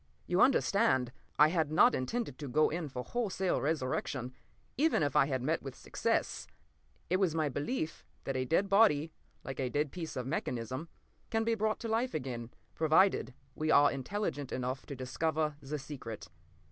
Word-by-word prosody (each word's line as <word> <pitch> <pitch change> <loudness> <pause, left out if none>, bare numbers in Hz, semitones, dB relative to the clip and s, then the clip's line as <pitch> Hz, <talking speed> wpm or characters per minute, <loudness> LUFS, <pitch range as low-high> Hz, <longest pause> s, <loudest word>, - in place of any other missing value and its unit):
You 180 +1 +2
understand, 200 - +3 0.3
I 150 +1 +7
had 160 -3 0
not 240 +10 +6
intended 140 - -2
to 145 - -5
go 150 +4 +3
in 160 -2 -3
for 125 -1 -5
wholesale 195 - -1
resurrection, 130 -3 -2 0.4
even 305 - +3
if 145 -2 -1
I 135 - +5
had 130 -3 -1
met 155 +5 0
with 135 -2 -7
success. - - -1 0.6
It 185 - +4
was 185 -5 +1
my 155 -2 +1
belief 155 - -3 0.2
that 135 - -3
a 130 - +1
dead 170 +8 +2
body, 195 -7 +4 0.3
like 135 0 -6
a 130 -2 0
dead 145 +2 0
piece 170 -3 -6
of 125 - -3
mechanism, 130 +1 -3 0.4
can 225 0 +1
be 230 0 +1
brought 215 0 0
to 230 - -3
life 230 +3 0
again, 125 -5 -4 0.2
provided 160 -4 +3 0.2
we 155 +3 -2
are 145 -1 +6
intelligent 145 -1 -3
enough 130 +1 -3
to 140 - -5
discover 155 +4 -1
the 145 +3 -4
secret. 125 -9 -8
150 Hz, 170 wpm, -32 LUFS, 130-185 Hz, 0.6 s, I